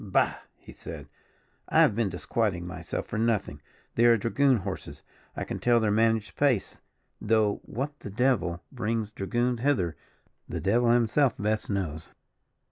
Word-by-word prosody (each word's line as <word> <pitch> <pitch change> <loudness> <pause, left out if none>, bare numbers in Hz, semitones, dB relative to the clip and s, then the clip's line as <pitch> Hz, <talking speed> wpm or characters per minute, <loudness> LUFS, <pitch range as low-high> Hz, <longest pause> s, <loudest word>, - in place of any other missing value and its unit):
"Bah!" 95 -3 +2 0.2
he - - -14
said, - - -9 0.6
"I - - +5
have - - +5
been 115 -3 +1
disquieting 90 0 -1
myself 90 +1 -5
for 105 - -4
nothing 105 -10 0 0.3
they 120 - +3
are 120 -1 +6
dragoon 130 +4 +2
horses; 95 - -6 0.3
I - - -2
can - - -5
tell 120 -1 +4
their 110 -2 +1
managed 110 -3 +1
pace; 135 -8 +1 0.4
though, 105 -1 +2
what 145 +5 -4
the - - -8
devil 100 -6 0
brings 115 -3 -2
dragoons 120 +4 -1
hither, 115 - +1 0.5
the - - -3
devil 115 +5 +2
himself 120 +3 +3
best 105 +1 -1
knows." 85 -6 -3
110 Hz, 150 wpm, -27 LUFS, 100-120 Hz, 0.6 s, are